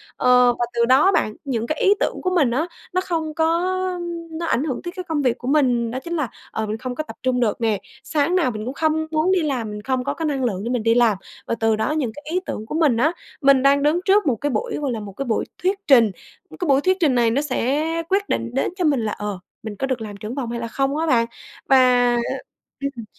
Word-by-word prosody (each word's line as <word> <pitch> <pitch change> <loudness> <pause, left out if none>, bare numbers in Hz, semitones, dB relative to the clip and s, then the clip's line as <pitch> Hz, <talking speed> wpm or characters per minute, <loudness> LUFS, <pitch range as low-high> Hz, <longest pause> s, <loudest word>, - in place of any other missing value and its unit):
Ờ, 250 -1 +5
và 240 - +2
từ 235 0 +2
đó 260 +6 +5
á, 385 - +5
bạn, 215 - 0
những 235 -4 -2
cái 310 - -2
ý 395 - +6
tưởng - - -1
của 370 - 0
mình 285 -9 +3
á, 295 +8 0 0.3
nó 370 - +2
không 325 -4 -2
có 320 0 +1 0.9
nó 325 +1 -4
ảnh 280 - +1
hưởng 275 -5 -3
tới 345 - -5
cái 365 - -4
công 315 -3 0
việc 250 -3 +1
của 245 - -8
mình. 250 -5 +2
Đó 255 - -3
chính 340 +5 -5
là, 300 -7 -1 0.2
ờ, 220 - -2
mình 215 +1 -3
không 250 +1 -5
có 310 - -2
tập - - -10
trung 255 -1 +1
được 235 -2 0
nè, 220 -3 +1 0.2
sáng 310 +4 +1
nào 330 -9 +2
mình 215 -1 -6
cũng 255 - -4
không 315 +1 0
muốn 315 +3 +2
đi 375 -2 +3
làm. 260 -8 -2
Mình 210 0 -6
không 260 +2 -1
có - - -2
cái 325 - -4
năng 280 -3 -1
lượng 200 -6 -1
để 230 - -3
mình 245 -3 -1
đi 230 0 +4
làm 235 -5 +4 0.3
và - - 0
từ 225 -1 +3
đó 220 +6 -1
những 295 -7 -1
cái 290 - -11
ý 360 - +1
tưởng 215 - -5
của 260 - -5
mình 300 -8 +3
á 300 +7 +3 0.3
mình 275 -2 +5
đang 280 +1 +4
đứng 305 +4 +3
trước 405 0 +4
một 255 - +3
cái 290 +7 -2
buổi, 470 - -2
gọi 285 -3 -2
là, 230 - -3
một 205 -2 -8
cái 275 +8 -4
buổi 230 -3 0 0.2
thuyết 385 +2 +1
trình. 235 -7 +6 0.5
Cái 355 - -2
buổi 275 -1 +4
thuyết 370 +4 +2
trình 295 -8 +3
này 235 -2 +3
nó 270 +5 +1
sẽ 285 0 0 0.3
quyết 400 +1 +1
định - - -1
đến 270 - 0
cho 365 -2 -1
mình 290 -4 +3
là, 210 - -1
ờ, 205 -2 -4 0.2
mình 215 -2 -6
có 270 - -2
được 260 -3 -2
làm 210 -2 -7
trưởng 215 +4 -6
phòng 250 -5 -3
hay 235 - -3
là 235 - -4
không 270 +5 -1
á, 320 - 0
bạn. 235 -6 +3 0.4
Và 250 -2 +5 0.6
ừm, 275 -5 -4
265 Hz, 270 wpm, -22 LUFS, 235-310 Hz, 0.9 s, ý